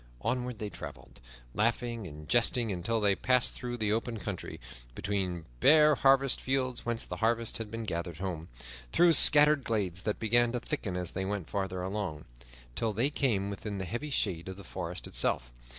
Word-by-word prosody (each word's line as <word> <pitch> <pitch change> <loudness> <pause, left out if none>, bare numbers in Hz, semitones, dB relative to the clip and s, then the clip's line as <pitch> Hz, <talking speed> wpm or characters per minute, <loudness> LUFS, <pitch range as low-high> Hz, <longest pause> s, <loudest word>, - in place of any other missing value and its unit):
Onward 125 - -2
they 105 -2 -5
traveled, - - -10 0.3
laughing 115 -1 -1
and 75 -1 -11
jesting, 120 -1 +3
until 100 +5 -1
they 100 -2 +3
passed 125 +2 +2
through 120 0 -5
the 105 -2 0
open 115 +1 -2
country; 95 -1 -6 0.4
between 90 -4 -2
bare 150 +1 +6
harvest 135 -1 +3
fields 130 -1 -1
whence 120 -1 -1
the - - -6
harvest 115 0 +1
had 110 -2 -5
been 115 +1 -5
gathered 85 -5 -4
home; 85 -3 -5 0.4
through 175 -1 +5
scattered 150 -1 +7
glades 95 -6 -1
that 105 +1 -2
began 120 +2 +2
to 125 - -1
thicken 115 -8 -4
as 90 -1 -2
they 95 - -3
went 95 -3 -4
farther 95 -2 -2
along, 95 -6 -4 0.5
till 110 - -1
they 120 +8 +1
came 105 -9 0
within 100 +1 -5
the 95 - -4
heavy 120 - -4
shade 95 - -1
of 95 0 -7
the 100 - -10
forest 90 -1 -5
itself. - - -1
110 Hz, 180 wpm, -30 LUFS, 95-120 Hz, 0.5 s, scattered